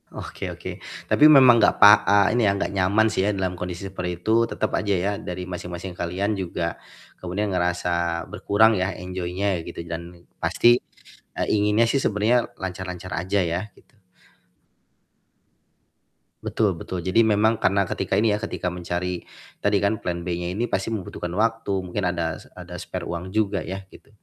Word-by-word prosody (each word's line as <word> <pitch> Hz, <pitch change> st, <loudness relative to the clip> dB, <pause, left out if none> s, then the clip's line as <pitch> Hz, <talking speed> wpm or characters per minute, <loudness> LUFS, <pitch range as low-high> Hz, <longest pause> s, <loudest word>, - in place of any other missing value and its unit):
Oke -, -, -7 dB
oke. -, -, -8 dB, 0.3 s
Tapi 150 Hz, -, +5 dB
memang 130 Hz, -5 st, +8 dB
gak -, -, +4 dB
pak 105 Hz, +1 st, +9 dB
eee, 100 Hz, -1 st, +4 dB
ini 120 Hz, -, +2 dB
ya, -, -, +4 dB
gak 100 Hz, -, -2 dB
nyaman 100 Hz, +3 st, +3 dB
sih 110 Hz, -, 0 dB
ya 105 Hz, -, +2 dB
dalam 95 Hz, -2 st, -2 dB
kondisi 90 Hz, +1 st, -5 dB
seperti 90 Hz, -2 st, -5 dB
itu 110 Hz, +5 st, +3 dB
tetep -, -, -2 dB
aja 100 Hz, -1 st, 0 dB
ya 95 Hz, +3 st, 0 dB
dari 90 Hz, 0 st, -5 dB
masing-masing 90 Hz, 0 st, -6 dB
kalian 90 Hz, +5 st, -2 dB
juga 85 Hz, -3 st, -3 dB, 0.5 s
kemudian 95 Hz, +4 st, -2 dB
ngerasa 85 Hz, -1 st, 0 dB
berkurang 110 Hz, +2 st, +3 dB
ya 95 Hz, 0 st, 0 dB
enjoy-nya 90 Hz, +1 st, -2 dB
gitu 85 Hz, 0 st, -7 dB
dan 85 Hz, +1 st, -8 dB, 0.2 s
pasti, 120 Hz, +1 st, +4 dB, 0.6 s
eee, -, -, -1 dB
inginnya 105 Hz, +2 st, +3 dB
sih 135 Hz, +4 st, +1 dB
sebenarnya 110 Hz, +4 st, +2 dB
lancar-lancar 90 Hz, -1 st, -6 dB
aja 90 Hz, +4 st, 0 dB
ya 85 Hz, +2 st, -1 dB, 0.2 s
gitu. 110 Hz, -, -25 dB, 2.4 s
Betul 105 Hz, -4 st, +1 dB
betul, 85 Hz, +1 st, -6 dB
jadi 95 Hz, +5 st, +4 dB
memang 110 Hz, 0 st, +2 dB
karena 100 Hz, +1 st, +2 dB
ketika -, -, -2 dB
ini 110 Hz, 0 st, +3 dB
ya, 105 Hz, -, -2 dB
ketika 90 Hz, -4 st, -3 dB
mencari 90 Hz, 0 st, -3 dB, 0.4 s
tadi 100 Hz, 0 st, +2 dB
kan 100 Hz, +2 st, 0 dB
plan 85 Hz, -1 st, -3 dB
B-nya 90 Hz, -1 st, -2 dB
ini 120 Hz, -, +1 dB
pasti 95 Hz, -3 st, -2 dB
membutuhkan 95 Hz, -5 st, -5 dB
waktu, 115 Hz, 0 st, 0 dB, 0.2 s
mungkin 90 Hz, +3 st, -3 dB
ada 85 Hz, -3 st, -2 dB
se -, -, -18 dB
ada 90 Hz, -1 st, -8 dB
spare -, -, -6 dB
uang 85 Hz, +2 st, -5 dB
juga 100 Hz, -1 st, 0 dB
ya 95 Hz, +3 st, -6 dB
gitu, -, -, -17 dB
95 Hz, 165 wpm, -24 LUFS, 90-105 Hz, 2.4 s, pak